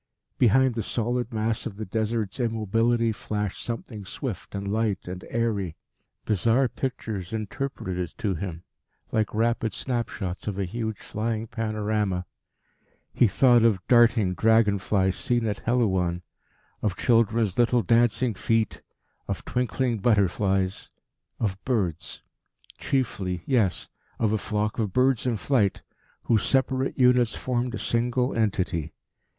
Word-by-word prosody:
Behind 130 +2 +4
the 115 - -2
solid 120 +3 -2
mass 110 0 -1
of 100 -4 -9
the 110 - -4
Desert's 110 +1 -2
immobility 115 0 +1
flashed 105 -2 -3
something 115 -2 -5
swift 95 - -6
and 100 0 -4
light 105 -2 -1
and 90 0 -6
airy. 105 -8 -1 0.5
Bizarre 115 +6 +2
pictures 110 -8 -4
interpreted 110 -3 -4
it 90 -2 -4
to 100 -3 -1
him, 85 -2 -5 0.5
like 110 -1 +1
rapid 115 0 +1
snap 120 -3 -2
shots 95 -3 -5
of 100 -2 -2
a 100 - 0
huge 110 +2 -3
flying 110 +1 -3
panorama: 105 -4 -1 0.9
he 120 - +4
thought 120 +2 +5
of 115 -4 +4
darting 115 -5 +5
dragon 110 +1 +3
flies 95 -1 +1
seen 120 -3 0
at 105 -2 -1
Helouan, 95 -8 +1 0.6
of 100 -2 -1
children's 115 -3 +2
little 120 0 +3
dancing 120 +3 +3
feet, 110 +2 0 0.5
of - - -4
twinkling 125 -1 0
butterflies 95 -2 +1 0.5
of 100 -3 -2
birds. 90 - -2 0.6
Chiefly, 95 -10 -1
yes, 95 - +1 0.3
of 110 -2 +1
a 110 - +1
flock 105 +2 -2
of 105 -5 -1
birds 130 -1 +2
in 120 -3 +1
flight, 105 -5 +1 0.4
whose 110 -3 +2
separate 135 0 +1
units 125 -2 +4
formed 125 -1 -2
a - - -3
single 125 +2 0
entity. 95 -7 -1
110 Hz, 135 wpm, -26 LUFS, 100-120 Hz, 0.9 s, thought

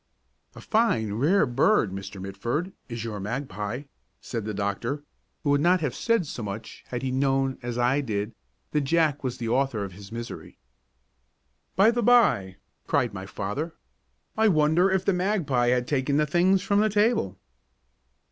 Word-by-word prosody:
"A - - -10
fine, 120 - +1
rare 155 - +3
bird, 125 - +2
Mr. 95 0 -7
Mitford, 120 - -3 0.2
is 115 -1 -4
your 110 -3 -4
magpie," 110 +2 -4 0.4
said 115 -4 -5
the 110 - -3
doctor, 110 +9 -2 0.4
who 145 - +2
would 145 0 +3
not 180 +3 +4
have 145 -6 -1
said 230 -6 +1
so 130 - -6
much 110 +1 -7
had 125 0 -4
he 130 - -1
known, 135 0 +1
as 120 -1 -4
I 125 +4 +2
did, 105 -3 -3 0.4
that 150 - +1
Jack 150 0 +1
was 125 -2 -2
the 115 -1 -3
author 125 -3 +1
of 100 - -6
his 100 +2 -12
misery. 115 +1 -7 1.2
"By 205 +4 +6
the 240 0 0
by," 155 - +4 0.3
cried 120 -4 +1
my 95 -1 -6
father, 140 +14 -4 0.6
"I 220 0 +4
wonder 160 +1 +4
if 190 -1 0
the 200 - +3
magpie 180 - +1
has 125 0 +2
taken 140 +1 0
the 150 - +3
things 180 +5 +3
from 200 +1 +2
the 215 +1 +3
table!" 205 - +1
135 Hz, 165 wpm, -26 LUFS, 110-175 Hz, 1.2 s, By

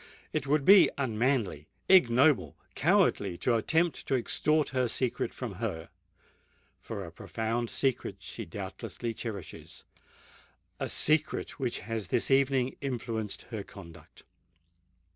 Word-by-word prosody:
It 150 -3 -2
would 145 0 +2
be 195 0 +8
unmanly—ignoble—cowardly 120 - +2
to 125 - +1
attempt 160 +9 0
to 135 - +2
extort 150 +4 +1
her 130 -2 0
secret 125 +1 -1
from - - -6
her,—for 80 0 -9
a - - -10
profound 115 +1 -3
secret 135 -3 -1
she - - -7
doubtless - - -7
cherishes—a 115 -5 -9
secret 155 -1 +1
which 125 -3 -2
has 110 -3 -4
this - - 0
evening 135 -1 +2
influenced 115 -6 -4
her 110 -3 -3
conduct! 90 -4 -13
125 Hz, 105 wpm, -29 LUFS, 110-140 Hz, -, be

